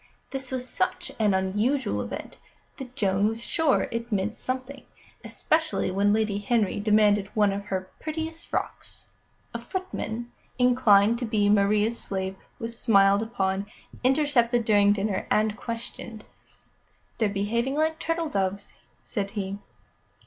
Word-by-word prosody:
This 265 Hz, -1 st, -3 dB
was 255 Hz, -1 st, -3 dB
such -, -, -2 dB
an 210 Hz, -3 st, +3 dB
unusual 210 Hz, +9 st, 0 dB
event -, -, -7 dB, 0.4 s
that 255 Hz, -2 st, -9 dB
Joan 200 Hz, -3 st, +2 dB
was 225 Hz, +1 st, -3 dB
sure 320 Hz, -5 st, +2 dB
it 230 Hz, 0 st, -4 dB
meant 205 Hz, +2 st, -1 dB
something, 260 Hz, +2 st, -4 dB, 0.4 s
especially 315 Hz, -, 0 dB
when 200 Hz, +2 st, +2 dB
Lady 215 Hz, -1 st, +1 dB
Henry 210 Hz, -1 st, +1 dB
demanded 210 Hz, -1 st, +3 dB
one 205 Hz, -2 st, +3 dB
of 200 Hz, 0 st, -5 dB
her 190 Hz, -2 st, -3 dB
prettiest 320 Hz, +1 st, -5 dB
frocks. -, -, -5 dB, 0.5 s
A -, -, -3 dB
footman, 240 Hz, -, -5 dB, 0.3 s
inclined 235 Hz, -3 st, +5 dB
to 250 Hz, -, -2 dB
be 210 Hz, -2 st, +2 dB
Maria's 210 Hz, +2 st, +3 dB
slave, 190 Hz, -1 st, -3 dB, 0.2 s
was 230 Hz, 0 st, -5 dB
smiled 200 Hz, -2 st, +5 dB
upon, 200 Hz, -3 st, -1 dB, 0.4 s
intercepted 255 Hz, -4 st, +3 dB
during 205 Hz, -2 st, +5 dB
dinner, 205 Hz, -1 st, -1 dB
and 215 Hz, 0 st, +2 dB
questioned. 230 Hz, -1 st, -7 dB, 0.9 s
"They're 220 Hz, -3 st, +2 dB
behaving 230 Hz, +7 st, -1 dB
like 315 Hz, +1 st, +1 dB
turtle 330 Hz, -1 st, -1 dB
doves," 200 Hz, -2 st, -2 dB, 0.3 s
said 200 Hz, -1 st, -3 dB
he. 200 Hz, -1 st, -4 dB
220 Hz, 135 wpm, -26 LUFS, 200-250 Hz, 0.9 s, inclined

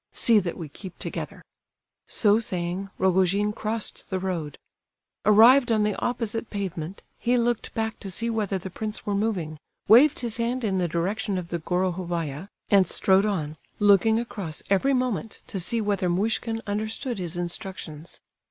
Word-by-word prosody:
See 230 Hz, -3 st, +4 dB
that 180 Hz, -4 st, -4 dB
we 165 Hz, -, -6 dB
keep 180 Hz, +5 st, -11 dB
together." -, -, -6 dB, 0.6 s
So 210 Hz, 0 st, +3 dB
saying, 185 Hz, -2 st, -3 dB
Rogojin 190 Hz, +3 st, +2 dB
crossed 220 Hz, 0 st, -3 dB
the 190 Hz, -, -1 dB
road. 175 Hz, -6 st, -3 dB, 0.7 s
Arrived 230 Hz, +5 st, +7 dB
on 215 Hz, -2 st, +3 dB
the 210 Hz, -1 st, +1 dB
opposite 230 Hz, -2 st, -2 dB
pavement, 185 Hz, -3 st, -5 dB, 0.2 s
he 245 Hz, +1 st, +2 dB
looked 240 Hz, -1 st, 0 dB
back 220 Hz, 0 st, -2 dB
to 195 Hz, -, -7 dB
see 230 Hz, +5 st, -3 dB
whether 215 Hz, -4 st, -1 dB
the 185 Hz, 0 st, -7 dB
prince 215 Hz, +3 st, -5 dB
were 205 Hz, -, -1 dB
moving, 190 Hz, -7 st, -1 dB, 0.3 s
waved 260 Hz, +6 st, +6 dB
his 235 Hz, -3 st, -2 dB
hand 240 Hz, +2 st, -1 dB
in 195 Hz, -4 st, 0 dB
the 175 Hz, -, +1 dB
direction 190 Hz, +5 st, -1 dB
of 175 Hz, -2 st, -5 dB
the 170 Hz, -, -2 dB
Gorohovaya, 175 Hz, -2 st, -2 dB, 0.2 s
and 195 Hz, -3 st, +6 dB
strode 195 Hz, +4 st, +3 dB
on, 155 Hz, -7 st, -2 dB, 0.2 s
looking 205 Hz, +2 st, +4 dB
across 195 Hz, -9 st, -5 dB
every 270 Hz, +8 st, +3 dB
moment 245 Hz, -4 st, -2 dB
to 195 Hz, -, -4 dB
see 230 Hz, +7 st, 0 dB
whether 200 Hz, -4 st, 0 dB
Muishkin 225 Hz, +4 st, 0 dB
understood 220 Hz, +3 st, -3 dB
his 175 Hz, -1 st, -3 dB
instructions. 175 Hz, -3 st, -5 dB
200 Hz, 160 wpm, -25 LUFS, 180-225 Hz, 0.7 s, Arrived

